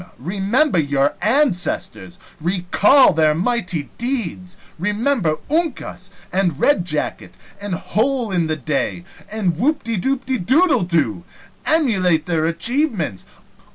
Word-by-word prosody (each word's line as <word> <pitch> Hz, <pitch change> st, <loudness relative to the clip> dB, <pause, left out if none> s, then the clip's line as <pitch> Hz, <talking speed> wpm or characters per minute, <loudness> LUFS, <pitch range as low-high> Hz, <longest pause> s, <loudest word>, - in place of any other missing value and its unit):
Remember 195 Hz, -, +1 dB
your 140 Hz, -1 st, +1 dB
ancestors! 195 Hz, -, 0 dB, 0.2 s
Recall 185 Hz, -, +4 dB
their 155 Hz, -1 st, +2 dB
mighty 180 Hz, -, -2 dB
deeds! 205 Hz, -7 st, -3 dB, 0.2 s
Remember 210 Hz, -, 0 dB
Uncas! 325 Hz, +3 st, -3 dB, 0.2 s
and 180 Hz, -6 st, 0 dB
Red 200 Hz, -12 st, +3 dB
jacket! 155 Hz, -4 st, -3 dB, 0.3 s
and 200 Hz, -3 st, -3 dB
Hole 235 Hz, +4 st, -1 dB
in 175 Hz, -3 st, 0 dB
the 155 Hz, -, -1 dB
Day! 155 Hz, +4 st, -3 dB, 0.3 s
and 200 Hz, -6 st, -1 dB
Whoopdedoodledo! 250 Hz, -, +1 dB, 0.5 s
Emulate 190 Hz, -, +2 dB
their 160 Hz, -2 st, 0 dB
achievements! 210 Hz, -, 0 dB
190 Hz, 95 wpm, -19 LUFS, 165-255 Hz, 0.5 s, Recall